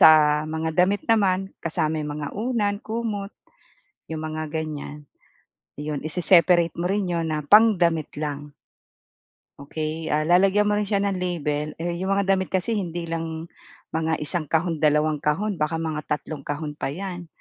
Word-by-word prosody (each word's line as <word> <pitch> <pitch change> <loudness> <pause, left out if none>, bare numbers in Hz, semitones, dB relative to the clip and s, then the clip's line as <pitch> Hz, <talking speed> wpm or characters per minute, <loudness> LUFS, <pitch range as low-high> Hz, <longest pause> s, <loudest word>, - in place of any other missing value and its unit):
sa 150 -1 +7
mga 160 +1 -2
damit 200 +1 -1
naman, 195 -4 +2
kasama 155 -1 -1
yung 150 -1 -3
mga 145 -1 -3
unan, 215 -2 0
kumot, 215 -3 -3 0.8
yung 160 - -3
mga 155 -1 -4
ganyan. 150 -2 -5 0.7
yun 150 -1 -3
i-se-separate 170 0 +4
mo 175 +2 -1
rin 200 -1 0
yun 170 -1 0
na 155 - 0
pang-damit 175 -3 +4
lang. 145 -1 -4 1.1
Okey 155 +3 -4
ah, 150 +1 +2
lalagyan 190 +4 +4
mo 210 - +2
rin 210 - -1
siya 200 -1 +1
ng 200 -2 0
label, 150 -4 -2
eh, 170 +1 -2
yung 190 +2 0
mga 200 - +2
damit 190 -1 -2
kasi 190 +4 -1
hindi 175 -5 -2
lang 165 0 -4 0.4
mga 160 0 0
1 155 +1 -3
kahon 165 0 +1
2 150 0 +3
kahon 185 +6 0
baka 155 +2 0
mga 160 -2 -2
3 150 0 -3
kahon 150 +1 -3
pa 150 - -3
yan. 175 +2 -6
165 Hz, 160 wpm, -24 LUFS, 155-190 Hz, 1.1 s, sa